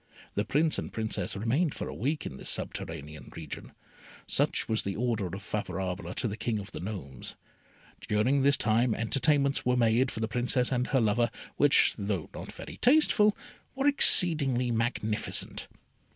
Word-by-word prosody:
The 105 Hz, -, -1 dB
Prince 155 Hz, +2 st, +1 dB
and -, -, -6 dB
Princess 110 Hz, -3 st, -3 dB
remained 135 Hz, -, 0 dB
for -, -, -5 dB
a -, -, -6 dB
week 145 Hz, +6 st, -3 dB
in 65 Hz, -, -7 dB
this -, -, -2 dB
subterranean 75 Hz, -1 st, -5 dB
region. 80 Hz, -4 st, -8 dB, 0.5 s
Such -, -, 0 dB
was 110 Hz, 0 st, 0 dB
the 100 Hz, -1 st, -4 dB
order 115 Hz, -4 st, -1 dB
of 95 Hz, +3 st, -8 dB
Favourable 95 Hz, -2 st, -4 dB
to -, -, -1 dB
the 105 Hz, -, -4 dB
King 115 Hz, 0 st, -2 dB
of 100 Hz, -1 st, -8 dB
the -, -, -7 dB
Gnomes. 90 Hz, -, -7 dB, 0.7 s
During 125 Hz, +7 st, +1 dB
this 140 Hz, 0 st, +4 dB
time 115 Hz, 0 st, +1 dB
entertainments 140 Hz, +4 st, +1 dB
were 125 Hz, 0 st, +1 dB
made 120 Hz, +2 st, +2 dB
for 110 Hz, -, -6 dB
the 110 Hz, -, -1 dB
Princess 125 Hz, +2 st, 0 dB
and 125 Hz, -1 st, 0 dB
her 135 Hz, -, +1 dB
lover, 115 Hz, +2 st, +1 dB, 0.3 s
which, 145 Hz, -1 st, +4 dB
though 100 Hz, -5 st, -3 dB
not -, -, -8 dB
very -, -, -10 dB
tasteful, 245 Hz, -6 st, +3 dB, 0.4 s
were 270 Hz, +1 st, -2 dB
exceedingly 150 Hz, -, +6 dB
magnificent. 115 Hz, -2 st, -1 dB
115 Hz, 165 wpm, -28 LUFS, 105-135 Hz, 0.7 s, exceedingly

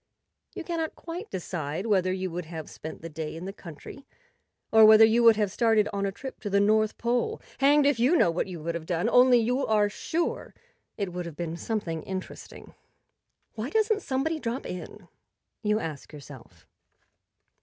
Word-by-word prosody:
You -, -, -5 dB
cannot 325 Hz, -2 st, -3 dB
quite 350 Hz, +6 st, -7 dB
decide 170 Hz, -1 st, -4 dB
whether 190 Hz, -4 st, +2 dB
you 185 Hz, -1 st, -3 dB
would 175 Hz, 0 st, -5 dB
have 160 Hz, -1 st, -8 dB
spent 160 Hz, +1 st, -9 dB
the -, -, -5 dB
day 155 Hz, 0 st, -6 dB
in 165 Hz, +3 st, -7 dB
the 195 Hz, -, -6 dB
country 190 Hz, -, -11 dB, 0.6 s
or 220 Hz, 0 st, +7 dB
whether 215 Hz, +1 st, +9 dB
you 225 Hz, +2 st, +3 dB
would 230 Hz, -1 st, +7 dB
have 210 Hz, -2 st, 0 dB
started 225 Hz, -1 st, +2 dB
on 200 Hz, 0 st, -1 dB
a -, -, -2 dB
trip 265 Hz, +7 st, -9 dB
to 205 Hz, -, -5 dB
the 200 Hz, 0 st, +2 dB
North 215 Hz, +1 st, +2 dB
Pole. 240 Hz, +1 st, -1 dB, 0.2 s
Hanged 285 Hz, +2 st, +5 dB
if 285 Hz, -4 st, +2 dB
you 260 Hz, +9 st, +4 dB
know 175 Hz, -, +4 dB
what 165 Hz, -, -2 dB
you 175 Hz, -4 st, -8 dB
would 170 Hz, +1 st, -2 dB
have 165 Hz, -1 st, -6 dB
done! 175 Hz, +4 st, 0 dB
Only, 250 Hz, +1 st, +6 dB
you 250 Hz, +4 st, 0 dB
are 210 Hz, -3 st, +2 dB
sure 330 Hz, +10 st, -3 dB, 0.4 s
it 195 Hz, -5 st, -3 dB
would 180 Hz, -1 st, -4 dB
have 165 Hz, -, -9 dB
been 165 Hz, 0 st, -4 dB
something 170 Hz, -4 st, -3 dB
interesting. 190 Hz, +2 st, -8 dB, 0.8 s
"Why 225 Hz, +4 st, -4 dB
doesn't 435 Hz, +3 st, +1 dB
somebody 295 Hz, +5 st, -1 dB
drop 240 Hz, 0 st, -4 dB
in? 180 Hz, +1 st, -8 dB, 0.3 s
" -, -, -57 dB
you 210 Hz, -1 st, +1 dB
ask 155 Hz, -6 st, -6 dB
yourself. 135 Hz, -, -13 dB
210 Hz, 185 wpm, -27 LUFS, 170-245 Hz, 0.8 s, whether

